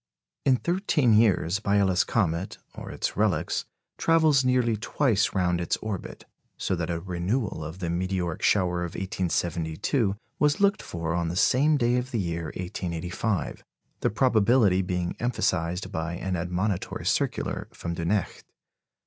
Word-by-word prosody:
In 130 - +5
thirteen 165 - +2
years 100 -4 +3
Biela's 100 -3 +2
comet 90 -4 -1 0.2
(or - - -8
its - - -3
relics) - - 0 0.3
travels 160 -4 +4
nearly 125 -3 +2
twice 110 -1 +1
round 90 -2 +1
its 85 - 0
orbit, 105 -4 -6 0.3
so - - -1
that 85 -1 -3
a 85 -1 -1
renewal 90 +2 -2
of 80 +3 -7
the 90 -3 -3
meteoric 90 -1 -2
shower 90 -3 +2
of 85 - -5
1872 95 - -1 0.2
was 150 +5 +3
looked 200 +1 +3
for 85 -1 -4
on 85 0 0
the 85 - -3
same 145 +10 +4
day 120 -1 +2
of 125 +1 -2
the 120 - -1
year 85 -3 -2
1885, 90 +2 -3 0.4
the - - +1
probability 110 -3 +3
being 90 -1 -2
emphasised 95 -6 -1
by 85 -2 -3
an 95 +1 -2
admonitory 90 +3 -2
circular - - -1
from 85 - -5
Dunecht. 85 +3 -1
95 Hz, 140 wpm, -26 LUFS, 85-115 Hz, 0.4 s, In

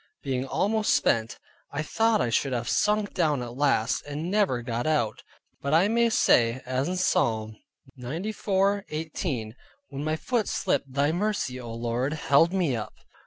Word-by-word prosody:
Being 130 -1 -2
almost 215 +8 +1
spent, 115 0 +1 0.3
I 150 +2 -2
thought 225 +5 +2
I 115 - 0
should 135 +3 +1
have 120 -1 -2
sunk 210 0 +1
down 150 -7 +1
at 120 0 -8
last, 130 -3 +1
and 150 +5 -4
never 195 - +1
got 120 +2 -2
out; 150 -8 0 0.4
but 140 +2 +1
I 180 +5 +4
may 235 +1 +3
say, 120 - +3
as 130 +3 -1
in 185 - -2
Psalm 110 -11 0 0.4
94.18, 165 - -2 0.4
"When 140 +1 -5
my 155 +1 0
foot 225 +5 -1
slipped, 135 - -1
thy 140 +3 +1
mercy, 180 -8 -1
O 120 -2 -7
Lord, 120 +4 -2
held 150 +2 +3
me 175 -9 +1
up." 110 -1 -6
145 Hz, 160 wpm, -26 LUFS, 125-190 Hz, 0.4 s, I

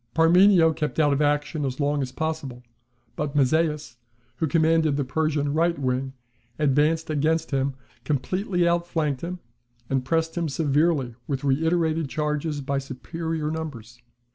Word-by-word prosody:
Parmenio 170 0 +6
kept 150 0 -3
out 145 -2 +4
of 140 - 0
action 145 +1 0
as 130 0 -3
long 145 0 +1
as 130 -2 -3
possible; 140 -4 -4 0.5
but 150 -1 -3
Mazaeus, 145 -3 +1 0.4
who 160 - 0
commanded 160 -2 +2
the 145 - +1
Persian 145 +1 0
right 170 +1 +2
wing, 130 0 -2 0.4
advanced 155 +2 +2
against 160 +2 0
him, 135 0 0 0.3
completely 180 +5 0
outflanked 170 -5 0
him, 180 +2 -4 0.5
and 135 -1 +1
pressed 160 +4 0
him 170 -2 -1
severely 145 -3 +1
with 135 -2 -3
reiterated 160 +2 +1
charges 150 +2 -2
by 140 0 -1
superior 155 +4 -4
numbers. 125 -8 -6
150 Hz, 140 wpm, -25 LUFS, 140-160 Hz, 0.5 s, Parmenio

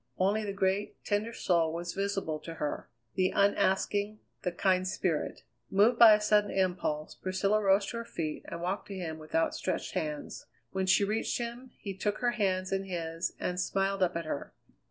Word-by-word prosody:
Only 200 +4 +2
the 205 - -2
great, 195 +1 -1
tender 210 +2 0
soul 170 -7 +1
was 170 +1 -4
visible 195 -5 -2
to 165 +1 -8
her; 150 -2 -3 0.2
the 185 0 +2
unasking, 200 +1 +2 0.2
the 180 - -1
kind 185 +1 +2
spirit. 180 -5 -1 0.3
Moved 215 +5 +4
by 225 -2 +10
a - - 0
sudden 210 -1 +3
impulse, 175 -5 -1
Priscilla 195 +3 0
rose 195 0 +4
to 235 - -4
her 230 - -3
feet 155 -8 -4
and 170 0 -6
walked 185 +3 -2
to 200 - -6
him 160 -4 -4
with 155 0 -8
outstretched 165 - 0
hands; 150 -2 -4 0.2
when 190 0 -1
she 195 +2 +5
reached 215 +3 0
him 240 +2 -5
he 195 -2 -6
took 205 +2 -1
her 245 -1 +1
hands 190 -5 0
in 195 0 0
his 165 -2 -3
and 180 0 -2
smiled 195 +1 0
up 180 -2 +2
at 170 -1 -2
her. 155 - -5
190 Hz, 185 wpm, -30 LUFS, 175-205 Hz, 0.3 s, by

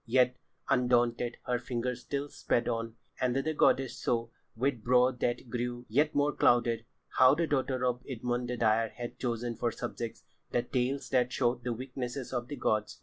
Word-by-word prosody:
Yet, 125 +1 +4 0.3
undaunted, 120 -1 +2
her 125 -1 0
fingers 125 0 -3
still 140 +1 -3
sped 120 -3 0
on, 115 0 -2 0.2
and 125 -1 +1
the 155 +4 0
goddess 135 -3 +3
saw, 115 -1 0 0.3
with 125 -1 0
brow 125 +1 +5
that 125 0 -2
grew 120 0 -3
yet 145 +7 +2
more 145 +1 +3
clouded, 115 -1 +3 0.3
how 130 +2 +8
the 170 +2 +1
daughter 130 -3 0
of 125 0 0
Idmon 120 -1 -2
the 125 0 -3
dyer 115 0 +3
had 120 +1 -7
chosen 120 -1 -2
for 120 +1 0
subjects 120 -1 -5 0.3
the 120 - +1
tales 130 +2 -1
that 125 -2 +2
showed 120 -1 0
the 125 - -1
weaknesses 125 +1 -5
of 120 -1 -2
the 145 - -5
gods. 110 -4 -1
125 Hz, 175 wpm, -31 LUFS, 120-130 Hz, 0.3 s, how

